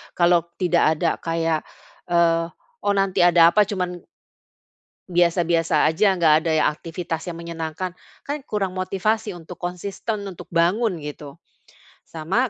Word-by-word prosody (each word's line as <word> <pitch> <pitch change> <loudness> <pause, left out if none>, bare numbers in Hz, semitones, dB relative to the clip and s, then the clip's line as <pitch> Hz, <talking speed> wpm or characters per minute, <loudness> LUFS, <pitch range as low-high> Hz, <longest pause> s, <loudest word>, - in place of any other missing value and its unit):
Kalau 175 -1 +3
tidak 170 -3 +3
ada 165 +1 +1
kayak, 165 -1 -1 0.5
eee, 165 -1 +3 0.4
"Oh, 205 - +2
nanti 195 -1 +1
ada 170 -1 +6
apa," 210 +1 +3
cuman 180 -3 -3 1.1
biasa-biasa 170 -2 +2
aja, 195 +5 +3
nggak 160 -3 +3
ada 165 - +1
ya - - +2
aktivitas 165 +1 -5
yang 175 - -4
menyenangkan, 170 +2 -5 0.2
kan 285 +1 -4
kurang 195 -5 -2
motivasi 205 +3 -1
untuk 175 0 -10
konsisten 195 +4 -4
untuk 180 - -10
bangun, 175 +2 +1
gitu. 150 +1 -9 0.6
Sama, 190 +11 -1
175 Hz, 130 wpm, -22 LUFS, 165-190 Hz, 1.1 s, ada